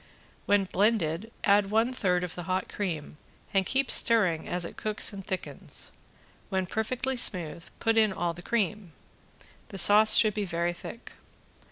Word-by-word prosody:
When 205 -1 +3
blended 200 -1 0
add 200 -1 +3
one 225 +4 +1
third 180 -7 0
of 180 - -5
the 175 - -6
hot 185 0 -1
cream 165 -7 -5 0.4
and 190 -2 +1
keep 265 0 0
stirring 185 -9 +3
as 180 -1 -2
it - - -9
cooks 215 0 0
and 195 -1 -8
thickens. 185 -1 -5 0.6
When 190 -1 -1
perfectly 250 +7 -3
smooth 175 -8 -1
put 225 0 +1
in 215 -2 +4
all 175 -2 -2
the 175 - -11
cream. 205 -4 -2 0.8
The 200 - -8
sauce 210 +4 +7
should 215 -2 +5
be 210 0 -2
very 170 -2 -2
thick. 230 +6 -10
200 Hz, 160 wpm, -28 LUFS, 175-220 Hz, 0.8 s, sauce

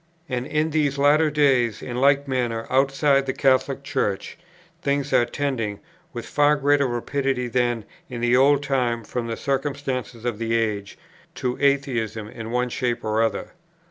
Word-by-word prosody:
And 125 -2 -3
in 155 +1 0
these 145 -2 +1
latter 150 +3 +4
days, 135 -7 +2
in 120 - -5
like 140 +2 +3
manner, 120 -4 -1
outside 135 +1 +3
the 130 - 0
Catholic 135 0 +2
Church 100 -7 -2 0.5
things 140 -2 -1
are 120 - +5
tending, 120 -6 -3 0.3
with 120 -2 -6
far 145 0 +3
greater 145 -1 +2
rapidity 125 +1 -1
than 120 -2 0 0.2
in 120 -2 -6
that 120 +1 +3
old 140 +2 +4
time 125 -5 0
from 120 +2 -4
the 115 - -4
circumstance 135 -3 -2
of 115 -1 -4
the 115 0 0
age, 105 -3 -2 0.4
to 125 -1 -2
atheism 120 -7 0
in 110 +1 -8
one 125 +1 0
shape 120 0 -2
or 110 0 +1
other. 115 - -1
130 Hz, 160 wpm, -23 LUFS, 115-140 Hz, 0.5 s, are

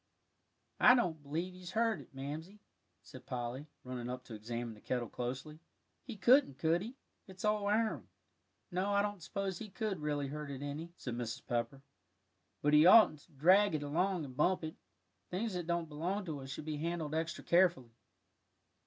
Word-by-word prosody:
"I 250 - +8
don't 170 - 0
b'lieve 165 +6 -3
he's 180 -1 -9
hurt 225 0 +1
it, - - -17
Mamsie," 155 +9 -6 0.4
said - - -13
Polly, 125 +3 -4 0.2
running 125 -1 -5
up 125 0 -5
to 120 - -10
examine 115 +2 -4
the 105 - -16
kettle 125 -2 -2
closely; 130 +7 -5 0.4
"he 240 -5 -8
couldn't, 235 - +5
could 165 +2 +2
he? 230 +6 -7 0.3
it's 190 +1 -7
all 210 -1 +2
iron." 220 +1 +1 0.6
"No, 190 +3 0
I 200 0 +4
don't 205 -3 -3
suppose 190 +2 -3
he 215 - -7
could 205 -2 -3
really 145 -1 -1
hurt 150 0 -5
it 140 0 -6
any," 150 +4 -5
said 125 - -5
Mrs. 120 -1 -4
Pepper, 120 +3 -2 0.8
"but 150 +1 +3
he 150 +3 +8
oughtn't 185 -6 +8
to - - -22
drag 185 +6 +5
it 150 - -2
along 175 +3 0
and 130 -2 -10
bump 180 +5 +2
it. 160 0 -4 0.6
Things 205 +4 -2
that 175 -2 -3
don't 170 -1 0
belong 175 +7 -2
to 155 -5 -4
us 135 0 -8
should 140 +2 -6
be 155 -1 -3
handled 160 -1 -2
extra 160 +1 -2
carefully. 170 -9 +3
160 Hz, 180 wpm, -34 LUFS, 140-190 Hz, 0.8 s, I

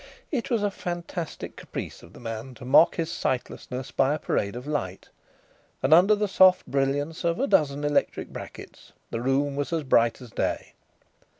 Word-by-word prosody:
It 265 -5 -2
was 230 -5 +1
a 205 - +1
fantastic 175 -2 -5
caprice - - -7
of 85 - -15
the - - -13
man 115 +2 -6
to 125 - -11
mock 145 +6 +6
his 165 -1 -2
sightlessness 130 0 -3
by 135 +2 +2
a - - -3
parade 100 -6 -1
of 125 +2 -7
light, 135 -12 -4 0.7
and 135 +4 +5
under 190 +6 +7
the 210 0 0
soft 185 -1 +5
brilliance 145 +4 -1
of 170 0 0
a 275 - +2
dozen 145 - +2
electric 145 0 0
brackets - - -10 0.2
the 115 - -2
room 140 +2 +1
was 145 +2 -2
as 165 -2 0
bright 120 -3 +3
as 125 -3 -12
day. - - -2
145 Hz, 180 wpm, -26 LUFS, 130-170 Hz, 0.7 s, under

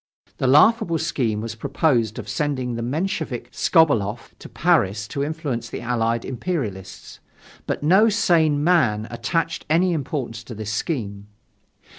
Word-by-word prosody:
The 130 - 0
laughable 170 - +4
scheme 115 -8 -1
was 115 0 -5
proposed 115 -2 0
of 115 -4 -7
sending 130 +1 -2
the 115 - -4
Menshevik 155 - -3
Skobeloff 120 - +1
to - - -11
Paris 105 +2 +1
to 140 - -2
influence 145 -6 -3
the - - -6
allied 115 -1 -1
imperialists. 120 - -5 0.5
But - - -3
no 190 +8 +5
sane 160 -8 +2
man 120 -11 +2
attached 120 +8 -2
any 175 +3 +3
importance 130 -6 -4
to 115 - -8
this 105 0 -5
scheme. 105 - -3
130 Hz, 135 wpm, -22 LUFS, 115-160 Hz, 0.5 s, no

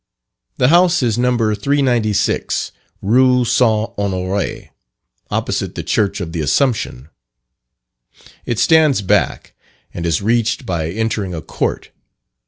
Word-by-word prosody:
The 125 - +3
house 175 -1 +4
is 115 -1 0
No. 125 0 +2
396, 110 -2 0 0.3
Rue 125 +4 +3
St. 110 -2 +2
Honore, 95 0 -3 0.6
opposite - - -2
the - - -4
Church 100 -2 0
of 85 -4 -5
the 80 -1 -3
Assumption. 80 - 0 1.3
It 120 - -3
stands 155 -6 +3
back, 90 - 0 0.4
and 85 - -5
is 80 -2 +1
reached 115 +1 0
by 80 -3 -2
entering 105 -2 -2
a 80 - -5
court. - - -3
110 Hz, 115 wpm, -17 LUFS, 95-125 Hz, 1.3 s, house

